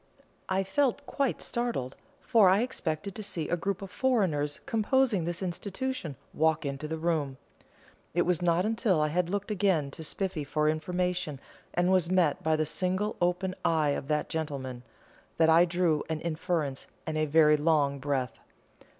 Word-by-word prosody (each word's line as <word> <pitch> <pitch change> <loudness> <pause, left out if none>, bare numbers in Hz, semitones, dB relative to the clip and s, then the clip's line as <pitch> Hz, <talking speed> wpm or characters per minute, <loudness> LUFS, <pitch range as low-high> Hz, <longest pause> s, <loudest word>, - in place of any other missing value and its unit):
I 190 +1 +1
felt 280 +6 0
quite 275 -3 -1
startled, 235 - -2 0.3
for 215 -5 +5
I 195 +3 +4
expected 195 -7 -2
to 215 - -6
see 170 -6 -3
a - - +1
group 195 +3 -3
of 195 - -8
foreigners 185 - +1
composing 225 -4 +2
this 175 +2 -3
institution 190 - -4 0.2
walk 160 0 +2
into 140 +2 -3
the 160 +1 -3
room. 155 -5 -1 0.8
It 175 - +4
was 180 -1 +1
not 175 +1 +2
until 220 -5 +2
I 150 0 +2
had 175 +2 0
looked 200 +2 -2
again 185 -8 +1
to 160 - -8
Spiffy 180 -1 -2
for 150 +2 0
information, 175 -1 -1 0.4
and 175 +1 +2
was 185 -3 +3
met 180 -5 +2
by 160 0 +2
the 155 0 +1
single 185 +6 -1
open 180 +1 +1
eye 160 -3 +2
of 140 - -2
that 150 0 0
gentleman, 140 -6 -4 0.6
that 160 0 +5
I 165 +2 +7
drew 170 -3 +1
an 160 -1 -1
inference 160 -4 -2 0.2
and 160 - -3
a 155 0 +1
very 150 0 +5
long 145 -2 +2
breath. 130 -2 -2
170 Hz, 165 wpm, -29 LUFS, 155-190 Hz, 0.8 s, I